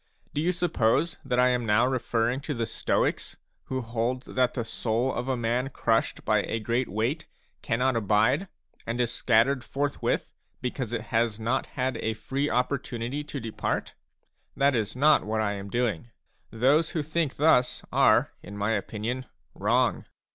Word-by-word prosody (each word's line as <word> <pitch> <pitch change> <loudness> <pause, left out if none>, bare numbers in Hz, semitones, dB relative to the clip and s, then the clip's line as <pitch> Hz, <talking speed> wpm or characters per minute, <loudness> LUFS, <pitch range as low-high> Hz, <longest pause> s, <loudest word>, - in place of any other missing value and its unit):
Do 145 - 0
you 175 +3 +2
suppose 165 -3 +1
that 125 -2 0
I 125 0 +5
am 125 -1 +1
now 110 +2 +3
referring 120 -1 0
to 150 0 -4
the 115 -1 -1
Stoics, 115 - -1
a - - -36 0.3
who 130 0 -2
hold 120 +2 -2
that 125 -1 0
the 120 -3 -2
soul 115 +3 -1
of 125 - -3
a 130 -1 0
man 120 +3 0
crushed 115 -4 0
by - - +3
a - - -2
great 120 +3 -1
weight 115 - -1 0.3
cannot 125 +1 +1
abide, 115 - +2 0.4
and 115 +2 -2
is 120 -1 +1
scattered 125 +3 +3
forthwith, 140 +3 -2 0.3
because 125 -2 -3
it 115 -1 -4
has 115 -1 +1
not 120 +4 0
had 130 0 0
a 110 0 -2
free 140 +6 -2
opportunity 125 +1 -1
to 145 - -5
depart? 115 -2 -3 0.6
That 140 0 +4
is 110 -3 -1
not 150 +3 +5
what 110 +1 -1
I 105 -2 +1
am 100 0 -6
doing; 120 -3 -1 0.4
those 140 +8 +3
who 155 - -2
think 155 -1 -1
thus 135 -4 +3
are, - - +4
in 100 +1 -9
my 105 +2 0
opinion, 115 +4 -3 0.3
wrong. - - +1
125 Hz, 170 wpm, -27 LUFS, 115-135 Hz, 0.6 s, I